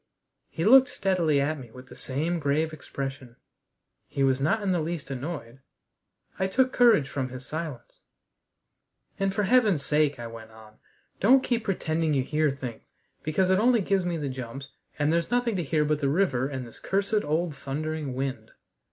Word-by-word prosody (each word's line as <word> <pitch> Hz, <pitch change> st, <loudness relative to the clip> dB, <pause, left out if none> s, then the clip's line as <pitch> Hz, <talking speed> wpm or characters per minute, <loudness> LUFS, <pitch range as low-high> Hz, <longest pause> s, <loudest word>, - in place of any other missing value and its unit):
He 165 Hz, -, -3 dB
looked 260 Hz, +4 st, +7 dB
steadily 170 Hz, -7 st, +1 dB
at 145 Hz, +2 st, 0 dB
me 125 Hz, -3 st, -10 dB
with 125 Hz, +3 st, -12 dB
the -, -, -13 dB
same 160 Hz, +6 st, -2 dB
grave 155 Hz, +2 st, 0 dB
expression. 135 Hz, -4 st, -6 dB, 0.7 s
He 140 Hz, -, -1 dB
was 135 Hz, 0 st, +2 dB
not 205 Hz, +10 st, +1 dB
in 195 Hz, -, +1 dB
the 180 Hz, -, +1 dB
least 155 Hz, -3 st, -4 dB
annoyed. 135 Hz, -2 st, -6 dB, 0.8 s
I 190 Hz, -, +2 dB
took 260 Hz, +6 st, +2 dB
courage 230 Hz, -, +5 dB
from 130 Hz, -3 st, -3 dB
his 130 Hz, 0 st, -8 dB
silence. 155 Hz, -6 st, -6 dB, 1.2 s
"And 195 Hz, 0 st, +1 dB
for 205 Hz, +2 st, 0 dB
heaven's 205 Hz, -, +3 dB
sake," 150 Hz, -1 st, +2 dB
I 120 Hz, -, -7 dB
went 115 Hz, -1 st, -9 dB
on, 110 Hz, -1 st, -16 dB, 0.4 s
"don't 260 Hz, +6 st, +5 dB
keep 235 Hz, -2 st, -1 dB
pretending 160 Hz, -5 st, 0 dB
you 135 Hz, -, +2 dB
hear 150 Hz, +2 st, +1 dB
things, 130 Hz, -4 st, -7 dB, 0.3 s
because 185 Hz, +5 st, +1 dB
it 190 Hz, -, +4 dB
only 235 Hz, 0 st, +4 dB
gives 195 Hz, 0 st, +1 dB
me 175 Hz, -1 st, -1 dB
the 145 Hz, -3 st, -3 dB
jumps, 130 Hz, +1 st, -6 dB, 0.3 s
and 150 Hz, +2 st, +1 dB
there's 170 Hz, 0 st, 0 dB
nothing 245 Hz, -2 st, +1 dB
to 175 Hz, -, -1 dB
hear 150 Hz, +1 st, +1 dB
but 150 Hz, 0 st, 0 dB
the 140 Hz, -, +2 dB
river 140 Hz, -6 st, +1 dB
and 130 Hz, -3 st, -5 dB
this 115 Hz, -, -13 dB
cursed 200 Hz, +2 st, 0 dB
old 155 Hz, +1 st, -1 dB
thundering 145 Hz, 0 st, -4 dB
wind." 130 Hz, -4 st, -3 dB
155 Hz, 180 wpm, -27 LUFS, 135-190 Hz, 1.2 s, looked